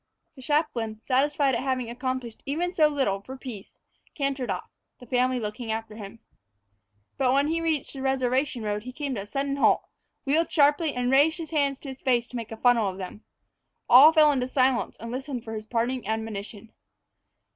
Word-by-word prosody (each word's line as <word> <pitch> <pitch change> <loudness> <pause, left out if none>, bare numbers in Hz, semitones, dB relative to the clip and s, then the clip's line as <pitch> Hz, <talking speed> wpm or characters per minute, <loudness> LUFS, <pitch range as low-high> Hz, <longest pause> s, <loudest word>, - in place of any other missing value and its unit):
The 265 - -12
chaplain, 245 -7 -1
satisfied 275 +1 +2
at 235 - 0
having 260 -2 -1
accomplished 250 -1 -4
even 345 +6 -1
so 310 -3 +5
little 265 -10 0
for 265 +6 -9
peace, 235 -7 -9 0.4
cantered 275 -3 -2
off, - - -4 0.3
the 250 - -13
family 250 +1 +1
looking 220 +1 -4
after 220 -1 -4
him. 205 0 -9 1.0
But 260 -2 +3
when 280 +2 +2
he 330 +1 0
reached 320 -4 -1
the 270 - -7
reservation 260 -1 0
road 210 0 -2
he 255 +3 -8
came 285 -1 -3
to 210 - -3
a - - -8
sudden 275 +5 -2
halt, - - +3 0.4
wheeled 315 +4 +1
sharply, 295 +1 +3
and 250 0 0
raised 290 +5 +4
his 330 -2 -7
hands 280 -3 +1
to 280 - -7
his 265 0 -9
face 245 -3 +1
to - - -10
make 230 -2 -5
a 225 - -6
funnel 235 -3 +3
of 185 - -7
them. 195 +3 -8 0.6
All 275 +6 +9
fell 310 -2 +6
into 255 -3 -1
silence 255 -1 +1
and 230 +1 -7
listened 260 -1 -5
for 225 - -7
his 215 0 -6
parting 240 +1 -1
admonition. 220 0 -5
255 Hz, 190 wpm, -26 LUFS, 230-280 Hz, 1.0 s, All